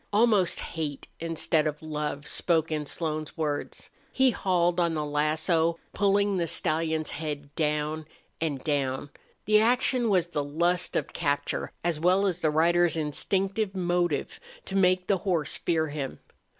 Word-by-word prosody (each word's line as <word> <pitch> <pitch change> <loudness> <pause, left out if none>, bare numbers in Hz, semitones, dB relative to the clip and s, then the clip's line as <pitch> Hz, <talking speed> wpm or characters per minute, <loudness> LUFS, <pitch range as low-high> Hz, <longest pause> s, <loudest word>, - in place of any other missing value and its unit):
Almost 210 -4 +3
hate, 150 -4 -5
instead 165 -1 +1
of 150 +1 -4
love, 150 -2 -3
spoke 165 -2 +1
in 150 -2 -2
Slone's 155 -2 -3
words. 150 -2 -3 0.2
He 260 -1 +4
hauled 180 -4 +1
on 170 -2 +1
the 150 -1 -1
lasso, 160 +3 +1 0.2
pulling 200 0 +2
the 170 -2 0
stallion's 160 0 0
head 145 -2 -5
down 150 0 -1 0.3
and 145 -5 -2
down. 140 -2 -1 0.3
The 215 0 +5
action 245 +1 +2
was 180 -4 +2
the 150 -4 -1
lust 170 +5 0
of - - -1
capture 145 -3 -1
as 170 -3 0
well 185 +4 +3
as 180 -3 0
the 160 - +2
rider's 170 +2 +3
instinctive 190 +6 -1
motive 175 -4 -1 0.3
to 195 - -5
make 185 -1 +3
the 195 - +2
horse 170 -5 -1
fear 160 -2 0
him. 145 -3 -4
165 Hz, 150 wpm, -27 LUFS, 150-180 Hz, 0.3 s, The